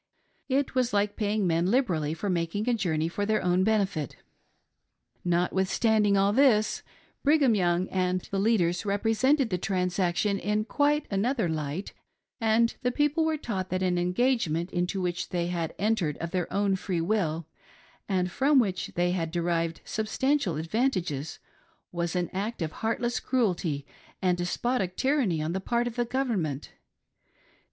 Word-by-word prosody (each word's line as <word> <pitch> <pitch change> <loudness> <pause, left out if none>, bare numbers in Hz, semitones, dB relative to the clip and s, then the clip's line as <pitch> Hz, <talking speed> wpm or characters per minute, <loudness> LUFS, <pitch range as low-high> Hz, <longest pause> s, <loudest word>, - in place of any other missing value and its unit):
It 275 +1 +1
was 250 -2 +1
like 205 0 +1
paying 210 -1 0
men 170 0 +2
liberally 180 - +1
for 185 +5 -4
making 180 +4 -1
a 245 - +3
journey 165 -8 0
for 190 +4 -3
their 215 +1 +1
own 180 +1 +2
benefit. 195 - 0 1.1
Notwithstanding 190 +4 +2
all 200 +1 +3
this, 230 -4 +3 0.4
Brigham 285 -4 +4
Young 180 -2 +1
and 185 -1 0
the 195 - -4
leaders 195 -5 +2
represented 225 +6 +2
the 180 - 0
transaction 185 +1 0
in 210 +2 0
quite 295 +3 +1
another 220 +2 +1
"light, 155 +3 -3 0.5
and 225 0 +3
the 250 - +1
people 295 +4 +1
were 315 -1 +1
taught 195 -9 -4
that 185 0 -1
an 180 -1 +1
engagement, 180 -3 0
into 180 +2 -1
which 175 -1 -2
they 175 -1 -1
had 170 -2 -3
entered 195 -7 0
of 170 0 -5
their 180 -2 -2
own 200 -1 +1
free 185 -2 -2
will, 165 -3 0 0.6
and 180 -2 0
from 275 +7 +3
which 195 -7 +1
they 175 0 +2
had 170 -3 -1
derived 170 -1 -1
substantial 220 - 0
advantages, 165 - -1 0.5
was 170 0 -2
an 175 -1 0
act 200 0 -3
of 155 - -3
heartless 235 +4 -1
cruelty 180 - 0 0.3
and 180 -1 +2
despotic 185 +1 -1
tyranny 260 - +1
on 160 +2 -2
the 190 - -2
part 235 +4 0
of 240 -1 -4
the 240 -1 0
Government. 220 - -2
195 Hz, 150 wpm, -27 LUFS, 175-230 Hz, 1.1 s, Brigham